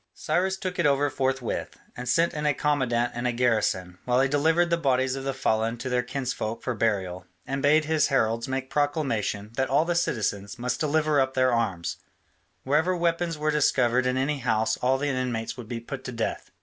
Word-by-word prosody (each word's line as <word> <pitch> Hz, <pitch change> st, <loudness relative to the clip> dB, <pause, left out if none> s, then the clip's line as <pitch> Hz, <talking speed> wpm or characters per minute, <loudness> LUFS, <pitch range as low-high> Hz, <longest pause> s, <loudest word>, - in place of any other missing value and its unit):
Cyrus 190 Hz, +2 st, 0 dB
took 185 Hz, -2 st, -4 dB
it 170 Hz, -, +4 dB
over 140 Hz, 0 st, +2 dB
forthwith, 130 Hz, -2 st, -2 dB, 0.2 s
and 125 Hz, 0 st, -5 dB
sent 165 Hz, +6 st, +3 dB
in 150 Hz, 0 st, -1 dB
a 145 Hz, -, +2 dB
commandant 130 Hz, -5 st, +1 dB
and 120 Hz, +1 st, -2 dB
a -, -, +1 dB
garrison, 110 Hz, -7 st, 0 dB
while 125 Hz, 0 st, +2 dB
he 135 Hz, -, +4 dB
delivered 160 Hz, +5 st, +2 dB
the -, -, +5 dB
bodies 130 Hz, -4 st, +1 dB
of 135 Hz, 0 st, -5 dB
the 135 Hz, -, 0 dB
fallen 115 Hz, -2 st, 0 dB
to 120 Hz, +2 st, -5 dB
their 125 Hz, 0 st, +2 dB
kinsfolk 125 Hz, -3 st, -4 dB
for 125 Hz, -, -1 dB
burial, 95 Hz, -5 st, -1 dB, 0.2 s
and 135 Hz, +1 st, -3 dB
bade 150 Hz, +2 st, +4 dB
his 155 Hz, -1 st, +2 dB
heralds 115 Hz, -3 st, +1 dB
make 130 Hz, 0 st, -3 dB
proclamation 130 Hz, -8 st, -1 dB
that 130 Hz, 0 st, +1 dB
all 145 Hz, +4 st, +3 dB
the 175 Hz, -, 0 dB
citizens 105 Hz, -, -1 dB
must 120 Hz, 0 st, -2 dB
deliver 155 Hz, -1 st, +2 dB
up 130 Hz, 0 st, -1 dB
their 130 Hz, -1 st, +3 dB
arms: 95 Hz, -8 st, -1 dB, 0.7 s
wherever 160 Hz, +7 st, +2 dB
weapons 170 Hz, -1 st, 0 dB
were 155 Hz, +1 st, 0 dB
discovered 130 Hz, -4 st, +2 dB
in 125 Hz, 0 st, 0 dB
any 140 Hz, +2 st, 0 dB
house 110 Hz, -3 st, +1 dB
all 130 Hz, +1 st, +2 dB
the 145 Hz, +2 st, -2 dB
inmates 125 Hz, -4 st, -2 dB
would 120 Hz, -4 st, -9 dB
be 120 Hz, 0 st, -4 dB
put 135 Hz, +3 st, -7 dB
to 125 Hz, -, -4 dB
death. 115 Hz, -2 st, -3 dB
130 Hz, 200 wpm, -26 LUFS, 115-150 Hz, 0.7 s, the